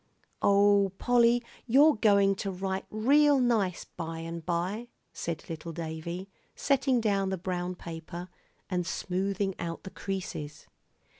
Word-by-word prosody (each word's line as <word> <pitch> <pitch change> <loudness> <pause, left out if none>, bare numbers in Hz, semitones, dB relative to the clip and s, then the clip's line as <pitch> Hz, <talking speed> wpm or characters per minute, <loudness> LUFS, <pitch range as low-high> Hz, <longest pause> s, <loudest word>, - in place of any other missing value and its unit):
"Oh, 200 -1 +4
Polly, 240 0 +4 0.2
you're 285 +6 +6
going 200 -2 +4
to 200 - -3
write 190 0 -3
real 280 +6 +4
nice, 220 -8 +1
by 165 -1 -6
and 165 0 -6
by," 180 +8 -2 0.3
said 165 -1 -5
little 165 +1 -6
Davie, 165 +3 -5 0.3
setting 270 -2 +2
down 200 -3 +1
the 190 - -1
brown 180 0 -3
paper, 170 +1 -7 0.4
and 180 -2 -2
smoothing 195 +1 -1
out 165 -1 -4
the 190 - -8
creases. 180 -6 -5
190 Hz, 130 wpm, -29 LUFS, 170-215 Hz, 0.4 s, you're